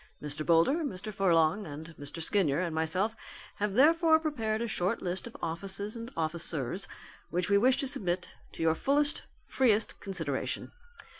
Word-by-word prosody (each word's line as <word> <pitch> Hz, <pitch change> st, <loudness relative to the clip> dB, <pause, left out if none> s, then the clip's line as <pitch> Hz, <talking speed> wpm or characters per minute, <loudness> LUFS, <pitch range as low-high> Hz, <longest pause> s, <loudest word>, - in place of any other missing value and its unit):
Mr. 150 Hz, +1 st, -4 dB
Boulder, 170 Hz, -, +4 dB
Mr. 215 Hz, -5 st, -5 dB
Furlong 185 Hz, 0 st, +2 dB
and 155 Hz, +3 st, -8 dB
Mr. 145 Hz, +4 st, -6 dB
Skinyer 160 Hz, -6 st, +2 dB
and 175 Hz, -3 st, -1 dB
myself 180 Hz, +8 st, 0 dB, 0.4 s
have 205 Hz, -1 st, -1 dB
therefore 320 Hz, +4 st, +6 dB
prepared 230 Hz, -9 st, -1 dB
a 235 Hz, -, -1 dB
short 185 Hz, -3 st, 0 dB
list 185 Hz, +5 st, -3 dB
of 235 Hz, -, -10 dB
offices 195 Hz, +5 st, -2 dB
and 230 Hz, 0 st, -6 dB
officers 160 Hz, 0 st, -2 dB, 0.4 s
which 180 Hz, +3 st, -1 dB
we 200 Hz, -, +6 dB
wish 255 Hz, +4 st, +4 dB
to 275 Hz, -, 0 dB
submit 180 Hz, -7 st, +1 dB, 0.2 s
to -, -, -4 dB
your 160 Hz, -1 st, +4 dB
fullest, 290 Hz, -, +1 dB, 0.2 s
freest 225 Hz, -5 st, +1 dB
consideration. 165 Hz, -8 st, -3 dB
190 Hz, 155 wpm, -30 LUFS, 165-225 Hz, 0.4 s, therefore